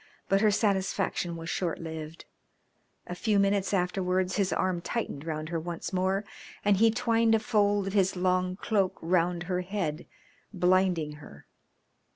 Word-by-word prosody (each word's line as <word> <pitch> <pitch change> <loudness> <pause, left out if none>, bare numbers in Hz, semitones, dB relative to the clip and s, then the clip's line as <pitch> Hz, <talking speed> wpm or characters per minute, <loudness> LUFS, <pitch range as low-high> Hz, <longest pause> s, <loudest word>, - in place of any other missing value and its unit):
But 195 0 +3
her 215 - +5
satisfaction 195 -4 0
was 165 0 -7
short 175 -3 -1
lived. 160 -1 -7 0.8
A - - -6
few 210 +3 +1
minutes 200 -1 +2
afterwards 185 0 0
his 195 -3 +1
arm 185 -2 0
tightened 170 -8 -4
round 155 -1 -3
her 170 -1 -1
once 170 +3 -5
more 190 +2 0 0.4
and 205 -1 +4
he 225 +3 +5
twined 230 -1 +2
a - - +2
fold 205 -3 +2
of 195 - -4
his 195 -2 +2
long 185 0 +1
cloak 195 -1 0
round 175 0 +1
her 180 0 -1
head, 180 -5 -3 0.4
blinding 180 -5 +1
her. 75 - -14
185 Hz, 155 wpm, -28 LUFS, 175-200 Hz, 0.8 s, her